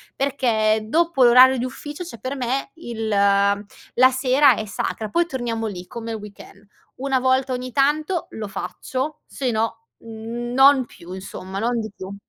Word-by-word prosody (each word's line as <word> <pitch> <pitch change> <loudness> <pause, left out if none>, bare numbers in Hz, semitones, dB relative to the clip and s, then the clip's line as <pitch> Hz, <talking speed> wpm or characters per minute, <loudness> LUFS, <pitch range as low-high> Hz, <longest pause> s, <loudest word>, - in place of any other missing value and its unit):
perché 220 -6 +1
dopo 330 +1 +2
l'orario 255 +2 +7
di 245 - -2
ufficio, 295 +6 -7
cioè, 230 -10 -10
per 265 +2 -4
me 265 +2 -2
il 230 -8 -5
la 200 +4 +2
sera 260 0 +4
è 215 - -4
sacra; 215 +1 -4
poi 340 +10 +2
torniamo 240 -6 -3
lì, 180 -3 -7
come 230 -2 -6
il 225 - -3
weekend: 205 -1 -13 0.4
una 270 -1 +1
volta 260 +1 +1
ogni 250 0 -4
tanto 305 +5 +1
lo 220 -1 -5
faccio, 255 - -5
se 260 -3 -3
no 225 +1 -2 0.2
non 240 +4 +2
più, 175 -6 -14
insomma, 190 0 -7
non 235 +2 0
di 215 - -6
più. 190 0 -8
240 Hz, 160 wpm, -22 LUFS, 215-265 Hz, 0.4 s, l'orario